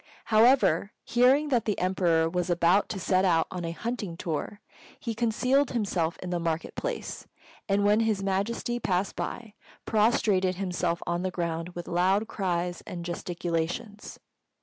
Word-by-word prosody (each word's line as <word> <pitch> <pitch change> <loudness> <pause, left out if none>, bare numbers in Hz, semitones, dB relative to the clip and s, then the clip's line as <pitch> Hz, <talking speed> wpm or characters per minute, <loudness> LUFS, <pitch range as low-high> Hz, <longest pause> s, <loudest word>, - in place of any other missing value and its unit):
However, 215 -5 +4
hearing 260 +5 +3
that 245 -5 +1
the 210 - 0
Emperor 175 -3 +2
was 180 +2 -2
about 175 +3 +3
to 195 - -4
set 185 +1 +2
out 170 -4 +3
on 180 -1 -4
a 165 - -2
hunting 205 -1 -4
tour, 165 +4 -4 0.4
he 230 - -3
concealed 245 +5 +2
himself 190 -8 -1
in 180 - -5
the 175 - 0
market 165 -1 -2
place, - - -5 0.4
and 200 +1 +2
when 210 +1 +4
His 220 -3 +1
Majesty 200 +5 -1
passed 190 -3 -1
by, 225 -3 -5 0.3
prostrated 210 -4 +2
himself 180 -2 -2
on 175 0 -1
the 185 - -1
ground 170 -1 -3
with 175 -1 -6
loud 190 +5 +2
cries 175 -4 -2
and 175 -1 -6
gesticulations. 175 +4 -4
185 Hz, 150 wpm, -27 LUFS, 175-220 Hz, 0.4 s, However